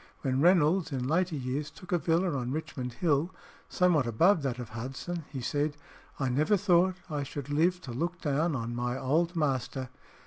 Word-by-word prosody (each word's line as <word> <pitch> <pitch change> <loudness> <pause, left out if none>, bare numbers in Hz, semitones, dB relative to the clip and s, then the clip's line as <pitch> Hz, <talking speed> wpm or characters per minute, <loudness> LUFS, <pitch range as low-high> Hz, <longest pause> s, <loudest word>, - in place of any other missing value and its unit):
When 130 -1 0
Reynolds 175 0 +4
in 130 -2 -2
later 170 +2 +1
years 140 +2 -3
took 180 +3 -13
a 175 - +3
villa 170 0 +1
on 125 -2 -2
Richmond 130 -4 -4
Hill, 155 +3 +1 0.4
somewhat 170 -8 +3
above 165 - +4
that 130 -3 -2
of 120 -3 -6
Hudson, 135 +8 -5
he 135 -3 -5
said, 145 +4 -1 0.4
"I 135 - +1
never 150 +11 +2
thought 185 -1 +3
I 150 -4 -2
should 140 0 -6
live 170 +5 +2
to 135 - -7
look 170 +8 -2
down 150 +2 0
on 115 -1 -3
my 120 +1 -1
old 165 +7 +1
master." 130 -4 -1
145 Hz, 180 wpm, -29 LUFS, 130-170 Hz, 0.4 s, Reynolds